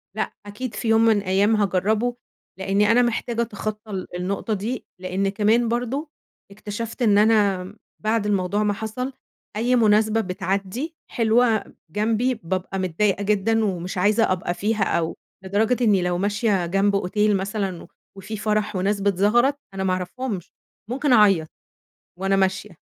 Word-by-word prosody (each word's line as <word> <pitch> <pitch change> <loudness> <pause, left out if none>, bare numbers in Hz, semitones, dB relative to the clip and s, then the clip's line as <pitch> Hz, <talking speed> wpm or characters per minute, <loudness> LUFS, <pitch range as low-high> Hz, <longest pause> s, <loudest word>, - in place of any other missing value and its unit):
لأ - - -2
أكيد 210 +3 -6
في 225 - -4
يوم 225 0 +4
من 225 -2 +4
الأيام 200 +2 +2
هاجرّبه، 210 +4 +1 0.4
لإنّي 200 +2 +2
أنا 245 +2 +5
محتاجة 235 -1 -1
أتخطى 215 -1 -5
ال 190 -2 -4
النقطة 195 +4 -2
دي. 215 +5 -3 0.2
لإن 190 +2 -1
كمان 220 +4 +2
برضه 245 +6 -2 0.4
اكتشفت 215 +4 -6
إن 210 -4 +4
أنا 210 -3 +4
آمم 190 +4 -10 0.3
بعد 215 0 +1
الموضوع 200 0 0
ما 205 -1 +1
حصل 220 +6 -4 0.4
أي 240 +4 +2
مناسبة 220 -1 +3
بتعدّي 195 - -3 0.2
حلوة 230 -1 +3 0.3
جنبي، 225 +7 0
بابقى 190 +2 -3
متضايقة 190 +3 0
جدًا 215 +2 +2
ومش 185 -2 -3
عايزة 205 +3 +3
أبقى 175 -1 -1
فيها 210 +2 0
أو 165 -3 -1 0.3
لدرجة 220 +6 +1
إنّي 205 -5 +4
لو 180 0 0
ماشية 205 -1 +1
جنب 195 +3 +1
أوتيل 205 +2 +1
مثلًا 195 -2 -3 0.3
وفي 205 +3 -6
فَرَح 210 -1 -1
وناس 200 +2 0
بتزغرط 210 +8 +2
أنا 190 0 -3
ما 185 -1 +1
أعرفهمش، 185 +1 -4 0.4
ممكن 270 +2 +1
أعيّط 195 -8 +5 0.7
وأنا 195 +1 +1
ماشية 195 +2 0
210 Hz, 145 wpm, -23 LUFS, 195-225 Hz, 0.7 s, أنا